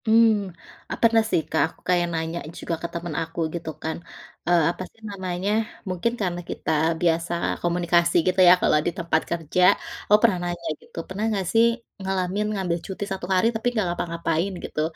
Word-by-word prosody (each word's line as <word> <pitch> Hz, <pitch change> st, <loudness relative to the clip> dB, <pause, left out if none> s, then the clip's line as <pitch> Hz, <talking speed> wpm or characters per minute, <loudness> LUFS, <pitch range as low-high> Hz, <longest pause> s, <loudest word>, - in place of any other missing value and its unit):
Mmm, 220 Hz, -3 st, +4 dB, 0.4 s
eee, -, -, -3 dB
pernah 230 Hz, -1 st, +6 dB
sih 165 Hz, -, +2 dB
Kak -, -, +1 dB
aku -, -, -17 dB
kayak 175 Hz, -1 st, +3 dB
nanya 160 Hz, +1 st, -2 dB, 0.2 s
juga 170 Hz, -, -2 dB
ke 170 Hz, -, -2 dB
teman 170 Hz, -1 st, -4 dB
aku 165 Hz, +1 st, -6 dB
gitu 170 Hz, -2 st, -4 dB
kan, 160 Hz, -, -2 dB, 0.5 s
eee, 175 Hz, -2 st, +5 dB
apa 175 Hz, -, -9 dB
sih 225 Hz, -, -28 dB
namanya, 190 Hz, 0 st, -3 dB, 0.4 s
mungkin 185 Hz, +6 st, 0 dB
karena 175 Hz, -3 st, -1 dB
kita -, -, -3 dB, 0.3 s
biasa 170 Hz, 0 st, +1 dB, 0.3 s
komunikasi 175 Hz, 0 st, +2 dB
gitu 185 Hz, +1 st, +1 dB
ya -, -, +10 dB
kalau -, -, +4 dB
di -, -, +2 dB
tempat 170 Hz, -1 st, +1 dB
kerja, 170 Hz, +1 st, -1 dB, 0.5 s
gua 210 Hz, -, +8 dB
pernah 210 Hz, -6 st, +4 dB
nanya 175 Hz, -1 st, -5 dB
gitu, -, -, -19 dB
"Pernah 195 Hz, +3 st, -4 dB
enggak 200 Hz, -3 st, -1 dB
sih, 225 Hz, 0 st, +6 dB, 0.4 s
ngalamin 190 Hz, +1 st, -1 dB
ngambil 185 Hz, -4 st, -1 dB
cuti 190 Hz, +1 st, -5 dB
1 190 Hz, -2 st, -3 dB
hari 185 Hz, +3 st, +3 dB
tapi 220 Hz, +2 st, -1 dB
nggak 210 Hz, -, +2 dB
ngapa-ngapain, 170 Hz, +1 st, -1 dB
gitu?" 155 Hz, -, -3 dB
180 Hz, 180 wpm, -24 LUFS, 170-195 Hz, 0.5 s, ya